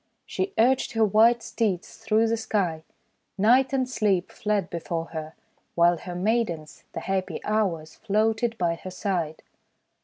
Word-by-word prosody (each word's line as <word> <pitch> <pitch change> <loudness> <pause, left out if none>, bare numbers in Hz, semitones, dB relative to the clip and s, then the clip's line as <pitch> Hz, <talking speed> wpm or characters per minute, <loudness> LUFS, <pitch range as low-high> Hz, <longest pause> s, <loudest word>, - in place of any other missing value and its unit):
She 380 +1 -2
urged 255 +3 +3
her 225 -1 +3
white 225 +3 +4
steeds 205 -6 -2
through 225 0 +2
the 225 - +1
Sky. 195 -8 -1 0.6
Night 245 +6 +4
and 260 -2 0
Sleep 200 -7 0
fled 205 -3 -1
before 165 0 -4
her, 155 0 -6 0.4
while 170 0 +4
her 175 +1 -7
maidens, 180 -5 -1
the - - -4
happy 190 -1 -2
Hours, 185 -8 -1
floated 225 +2 0
by 170 -3 +1
her 185 - -8
side. 180 -5 -3
210 Hz, 145 wpm, -26 LUFS, 175-225 Hz, 0.6 s, white